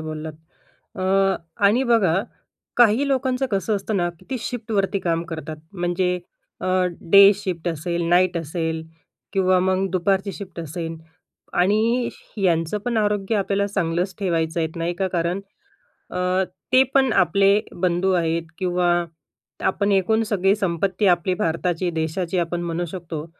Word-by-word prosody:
बोललात. 155 0 -5 0.7
अ, - - -2 0.6
आणि 220 +6 +4
बघा, 200 -8 +4 0.6
काही 240 +3 +5
लोकांचं 260 0 0
कसं 205 +1 0
असतं 200 +1 -3
ना, 175 -1 +1
की 175 +2 -21
ती 260 - -1
शिफ्टवरती 215 -5 -1
काम 165 -2 0
करतात. 160 -1 -6 0.2
म्हणजे 180 0 0 0.4
अ, - - -2 0.5
डे 200 +1 +9
शिफ्ट 180 -4 -4
असेल, 170 +2 -2
नाईट 180 0 +3
असेल 160 0 -2 0.5
किंवा 185 -1 +3
मग 190 +1 +1
दुपारची 190 +2 0
शिफ्ट 195 -4 -9
असेल 165 +1 -5 0.6
आणि 220 +6 +2 0.3
यांचं 175 0 +1
पण 240 -2 -1
आरोग्य 210 0 +1
आपल्याला 200 0 0
चांगलंच 180 -1 -1
ठेवायचं 165 -3 0
आहे, 160 - +1
नाही 170 +1 -2
का. 190 +1 -1
कारण, 175 +2 0 0.7
अ, 180 +1 0 0.3
ते 260 - +8
पण 265 -3 +4
आपले 200 0 +4 0.3
बंधू 185 +1 +2
आहेत 165 0 -1
किंवा 180 -1 0 0.8
आपण 200 +1 0
एकूण 220 +4 +2
सगळी 195 +1 +3
संपत्ती 190 +1 -1
आपली 175 +2 -1
भारताची, 175 +1 -1
देशाची 170 +3 -2
आपण 175 0 -2
म्हणू 170 0 -2
शकतो. 165 -3 -6
185 Hz, 140 wpm, -22 LUFS, 170-200 Hz, 0.8 s, डे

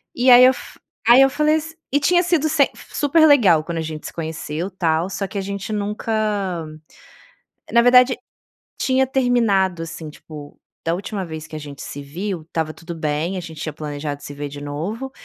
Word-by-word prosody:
E 250 +2 +3
aí 245 +1 +9
eu 255 - +7
f - - -11 0.3
aí 240 +3 +8
eu 270 - +6
falei 300 +2 +2
as 325 +1 -6 0.2
e 285 - +3
tinha 350 +5 +3
sido 335 -3 +1
semp 290 -3 +3 0.2
super 315 +2 +3
legal 200 - +5
quando 170 +1 -5
a - - -1
gente 155 -1 -6
se - - -8
conheceu, 160 +1 -4
tal. 170 -1 0
Só 195 +1 -3
que 200 - -7
a - - -1
gente 200 +1 -5
nunca 210 +2 -3 1.6
na 235 - +6
verdade 250 +1 +6 0.7
tinha 265 0 +2
terminado. 225 -9 +1
Assim, 160 -1 -7
tipo, 150 -1 -12 0.3
da 165 - +1
última 200 +1 -4
vez 160 -2 -7
que 155 - -10
a - - -4
gente 145 -2 -9
se 145 - -7
viu, 175 +4 -5
estava 160 0 -3
tudo 170 +1 -9
bem, 160 +4 -2
a - - -3
gente 160 -3 -9
tinha 155 - -4
planejado 145 -1 -5
se 145 - -8
ver 145 0 -5
de 145 0 -9
novo, 185 - -5
185 Hz, 195 wpm, -21 LUFS, 155-250 Hz, 1.6 s, aí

